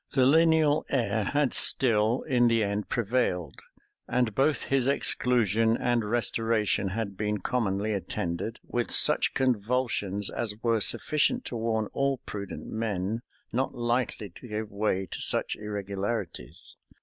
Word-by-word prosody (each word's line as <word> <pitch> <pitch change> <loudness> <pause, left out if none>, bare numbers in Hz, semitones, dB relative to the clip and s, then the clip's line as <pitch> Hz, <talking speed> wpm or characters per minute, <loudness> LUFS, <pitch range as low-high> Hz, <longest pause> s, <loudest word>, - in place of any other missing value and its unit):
The 130 -2 +5
lineal 160 +1 +4
heir 115 -5 0
had 145 -2 +1
still 115 -1 +2
in 125 -4 +3
the 115 -1 +2
end 100 0 -2
prevailed: 105 - -1 0.5
and 125 -4 0
both 140 +5 +1
his 135 -2 +1
exclusion 115 -5 +2
and 120 -2 +1
restoration 115 -3 0
had 100 0 -3
been 105 +1 -1
commonly 105 -2 -1
attended 95 +2 -3
with 120 -1 -2
such - - +3
convulsions 115 -5 0
as 110 -3 -2
were 115 -2 +2
sufficient 155 - +2
to - - -5
warn 110 -1 0
all 140 -1 +1
prudent 100 -1 -6
men 110 -1 -2 0.3
not 130 +3 -1
lightly 120 -4 -1
to 125 - -12
give 105 -1 -4
way 100 -2 0
to - - -6
such - - 0
irregularities. 100 - -5
115 Hz, 135 wpm, -28 LUFS, 105-125 Hz, 0.5 s, The